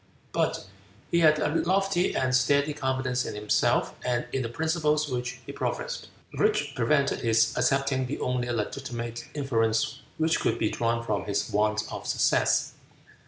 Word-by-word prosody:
But -, -, 0 dB, 0.5 s
he 170 Hz, -, +3 dB
had 155 Hz, -2 st, +5 dB
a 150 Hz, -1 st, 0 dB
lofty 185 Hz, +3 st, +1 dB
and 130 Hz, -1 st, +1 dB
steady 140 Hz, +4 st, +3 dB
confidence 130 Hz, -3 st, -1 dB
in -, -, -5 dB
himself 105 Hz, 0 st, +1 dB
and 120 Hz, -1 st, 0 dB
in 135 Hz, -, 0 dB
the 115 Hz, -, -3 dB
principles 155 Hz, +1 st, 0 dB
which 125 Hz, -2 st, -3 dB
he -, -, -6 dB
professed, -, -, -3 dB, 0.3 s
which -, -, +1 dB
prevented 140 Hz, +4 st, +1 dB
his 115 Hz, -1 st, +3 dB
accepting 135 Hz, -1 st, +1 dB
the 140 Hz, -, -4 dB
only 125 Hz, -1 st, -1 dB
legitimate 120 Hz, +1 st, -4 dB
inference 115 Hz, -6 st, 0 dB, 0.2 s
which 160 Hz, +1 st, +2 dB
could 115 Hz, -, 0 dB
be 110 Hz, -2 st, 0 dB
drawn 115 Hz, 0 st, 0 dB
from 105 Hz, -3 st, -1 dB
his 100 Hz, -1 st, -1 dB
want 105 Hz, +1 st, +1 dB
of -, -, -6 dB
success. -, -, +2 dB
130 Hz, 155 wpm, -27 LUFS, 115-150 Hz, 0.5 s, had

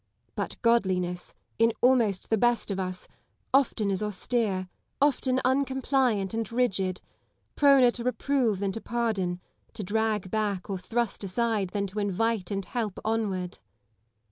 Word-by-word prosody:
But -, -, -4 dB
godliness, 185 Hz, -6 st, +1 dB, 0.2 s
in 230 Hz, 0 st, +4 dB
almost 235 Hz, -7 st, +2 dB
the 220 Hz, -, +4 dB
best 240 Hz, -2 st, +2 dB
of 195 Hz, -, -2 dB
us, 185 Hz, -1 st, -3 dB, 0.5 s
often 240 Hz, -6 st, +3 dB
is 190 Hz, -, 0 dB
austere, 210 Hz, -2 st, -1 dB, 0.3 s
often 265 Hz, -2 st, +2 dB
uncompliant 260 Hz, -6 st, +1 dB
and 225 Hz, -1 st, -2 dB
rigid 195 Hz, -7 st, 0 dB, 0.3 s
— -, -, -46 dB
proner 275 Hz, -4 st, +6 dB
to 235 Hz, -, -3 dB
reprove 250 Hz, -3 st, +1 dB
than 195 Hz, 0 st, -1 dB
to 225 Hz, -, -5 dB
pardon, 210 Hz, -7 st, -1 dB, 0.4 s
to 210 Hz, -, -4 dB
drag 210 Hz, -1 st, -1 dB
back 205 Hz, -3 st, -1 dB
or 190 Hz, -, -2 dB
thrust 230 Hz, +3 st, -2 dB
aside 210 Hz, 0 st, 0 dB
than 200 Hz, +1 st, -1 dB
to 200 Hz, +2 st, -4 dB
invite 205 Hz, 0 st, 0 dB
and 195 Hz, -2 st, -2 dB
help 220 Hz, -5 st, -3 dB
onward. 200 Hz, -5 st, -1 dB
215 Hz, 140 wpm, -27 LUFS, 190-240 Hz, 0.5 s, proner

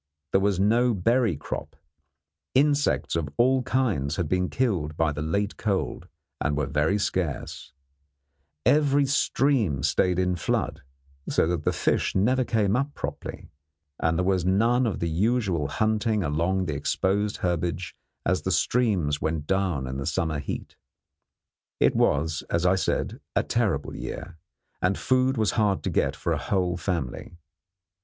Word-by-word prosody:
There 95 Hz, -, +3 dB
was 100 Hz, -2 st, +1 dB
no 115 Hz, +4 st, +3 dB
berry 115 Hz, -, +2 dB
crop, -, -, -6 dB, 0.8 s
insects 145 Hz, -, +2 dB
of 80 Hz, -4 st, -1 dB
all 130 Hz, +2 st, +4 dB
kinds 110 Hz, -, 0 dB
had 90 Hz, -4 st, -1 dB
been 90 Hz, +3 st, 0 dB
killed 90 Hz, -, -1 dB
by 80 Hz, -2 st, +2 dB
the 75 Hz, +1 st, -4 dB
late 100 Hz, +7 st, -1 dB
cold 95 Hz, -3 st, -2 dB, 0.3 s
and 75 Hz, 0 st, 0 dB
were 75 Hz, -, +1 dB
very 75 Hz, +8 st, +1 dB
scarce, 90 Hz, -8 st, -3 dB, 0.9 s
every 145 Hz, -1 st, +4 dB
stream 130 Hz, -, +1 dB
stayed 90 Hz, +3 st, +2 dB
in 90 Hz, -1 st, +1 dB
flood, -, -, -1 dB, 0.5 s
so -, -, +2 dB
that 80 Hz, -2 st, -2 dB
the -, -, +3 dB
fish -, -, 0 dB
never 125 Hz, +7 st, +3 dB
came 110 Hz, -4 st, +1 dB
up 140 Hz, +3 st, -1 dB
properly, -, -, -6 dB, 0.5 s
and 80 Hz, 0 st, +1 dB
there 90 Hz, -, +1 dB
was 95 Hz, -2 st, +2 dB
none 115 Hz, +7 st, +3 dB
of 105 Hz, -, -3 dB
the 85 Hz, -, 0 dB
usual 95 Hz, -, +1 dB
hunting 110 Hz, -, 0 dB
along 85 Hz, +5 st, 0 dB
the 80 Hz, -, -2 dB
exposed 100 Hz, +8 st, 0 dB
herbage 85 Hz, 0 st, -2 dB, 0.3 s
as -, -, +1 dB
the -, -, -2 dB
streams 95 Hz, -12 st, +1 dB
went 80 Hz, -1 st, -1 dB
down 95 Hz, -7 st, 0 dB
in 65 Hz, +1 st, -4 dB
the 70 Hz, +1 st, -4 dB
summer 80 Hz, -2 st, -1 dB
heat. 70 Hz, -, -6 dB, 1.0 s
It -, -, +3 dB
was, 80 Hz, +2 st, +1 dB
as 85 Hz, +1 st, 0 dB
I 90 Hz, -, +5 dB
said, 90 Hz, -4 st, -1 dB, 0.2 s
a -, -, +3 dB
terrible 110 Hz, -, -1 dB
year, 85 Hz, -3 st, -7 dB, 0.4 s
and 90 Hz, +1 st, +1 dB
food 130 Hz, 0 st, +2 dB
was 110 Hz, -2 st, +2 dB
hard 105 Hz, -4 st, +1 dB
to -, -, -1 dB
get -, -, +1 dB
for -, -, -1 dB
a -, -, -1 dB
whole 90 Hz, -3 st, 0 dB
family. 85 Hz, -3 st, -4 dB
95 Hz, 155 wpm, -26 LUFS, 80-110 Hz, 1.0 s, I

